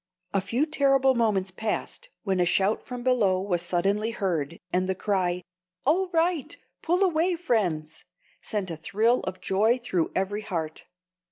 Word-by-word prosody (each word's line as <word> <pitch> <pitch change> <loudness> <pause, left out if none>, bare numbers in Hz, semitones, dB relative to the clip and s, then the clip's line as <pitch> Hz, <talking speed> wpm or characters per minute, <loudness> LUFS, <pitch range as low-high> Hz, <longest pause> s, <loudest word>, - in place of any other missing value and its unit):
A 195 - +2
few 235 +9 0
terrible 275 -3 +3
moments 210 -6 +1
passed, 220 - -3
when 190 -3 0
a - - +4
shout 195 +4 +2
from 245 -1 -7
below 220 -8 +3
was 185 -3 -1
suddenly 200 +6 0
heard, 170 -8 -2 0.2
and 185 +1 +1
the 190 - +1
cry, 180 -3 0 0.4
"All 360 +6 +2
right! 330 -2 0 0.2
pull 355 +4 +2
away, 350 0 +2
friends!" 180 - -1 0.4
sent 200 -5 -2
a - - -3
thrill 225 +8 +2
of 185 0 -5
joy 210 +6 +2
through 185 -9 -1
every 200 +2 -1
heart. 160 -6 -4
205 Hz, 155 wpm, -26 LUFS, 185-255 Hz, 0.4 s, a